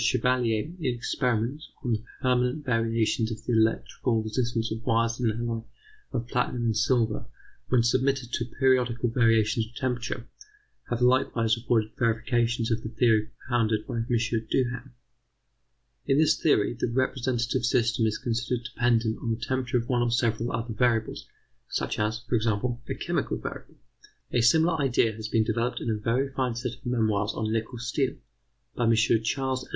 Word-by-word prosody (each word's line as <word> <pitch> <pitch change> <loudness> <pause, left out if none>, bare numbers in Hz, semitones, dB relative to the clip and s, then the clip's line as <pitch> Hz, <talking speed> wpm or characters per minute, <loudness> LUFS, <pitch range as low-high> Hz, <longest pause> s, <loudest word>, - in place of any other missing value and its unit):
Chevalier 125 -3 +2 0.2
in 130 -7 -1
experiments 125 +3 -1
on 125 - -1
the 110 0 -2 0.2
permanent 125 +3 +1
variations 115 -2 +1
of 110 -1 -7
the 120 - 0
electrical 115 +1 +1
resistance 115 +1 -1
of 110 +1 -4
wires 115 0 +1
of 125 - 0
an 110 - -2
alloy 115 -1 -2 0.5
of 120 -2 -3
platinum 125 0 -1
and 110 -1 +1
silver 115 0 +1 0.4
when 125 -2 +4
submitted 130 +1 +1
to 120 - 0
periodical 125 -1 +1
variations 115 -2 +2
of 115 - -20
temperature, 125 -1 -3 0.6
have 120 0 -2
likewise 120 -3 +3
afforded 115 -2 0
verifications 120 0 +1
of 115 0 0
the 110 - -5
theory 110 -2 +2
propounded 115 -4 0
by - - -4
M. 115 0 -2
Duhem. 120 +2 -1 1.2
In 135 - +3
this 155 0 +4
theory, 120 -10 +2
the 115 - 0
representative 125 -1 0
system 120 -1 +2
is 110 - -1
considered 120 +1 -2
dependent 115 -2 +1
on 115 - -3
the 110 0 -1
temperature 125 0 -1
of 120 0 -2
one 125 -1 +1
or 120 - +2
several 115 0 0
other 115 +1 -3
variables, 115 -1 0 0.4
such - - -2
as, 110 +2 -1
for 125 - -4
example, 120 +1 0
a - - -1
chemical - - -2
variable. - - -8 0.6
A 120 - +2
similar 160 +7 +4
idea 120 -4 +2
has 110 0 -6
been 110 0 +2
developed 120 +3 -1
in 115 - -2
a - - +1
very 130 +5 +1
fine 130 -3 -1
set 120 0 -3
of - - -16
memoirs 110 -4 +1
on 110 0 -1
nickel 115 +2 -2
steel, 125 +3 -1 0.6
by 120 - 0
M. 115 0 +4
Ch. 110 +2 +2
Ed. 130 -1 0
120 Hz, 165 wpm, -27 LUFS, 115-125 Hz, 1.2 s, when